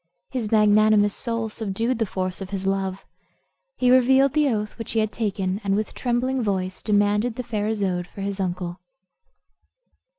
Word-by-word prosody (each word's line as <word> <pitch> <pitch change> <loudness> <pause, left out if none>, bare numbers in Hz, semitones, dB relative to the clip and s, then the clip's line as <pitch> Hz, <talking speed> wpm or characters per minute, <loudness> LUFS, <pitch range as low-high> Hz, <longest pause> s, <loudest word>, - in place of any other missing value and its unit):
His 235 -5 -3
magnanimous 210 -1 +4
soul 230 -2 -2
subdued 225 +3 -2
the 225 - +1
force 185 0 -3
of 190 - -6
his 195 -1 -4
love. 195 -1 -2 0.7
He 250 0 +3
revealed 265 +1 +5
the 300 -2 +3
oath 210 -1 -3
which 225 - -5
he 225 - +2
had 215 -1 0
taken, 200 -2 -2
and 195 -1 +1
with 215 +1 -2
trembling 255 +1 0
voice 190 -4 -2
demanded 210 +2 +2
the 250 - -4
fair 215 -3 -2
Isoude 190 -5 -1
for 200 - -10
his 200 0 -3
uncle. 180 -1 -3
210 Hz, 165 wpm, -24 LUFS, 195-230 Hz, 0.7 s, revealed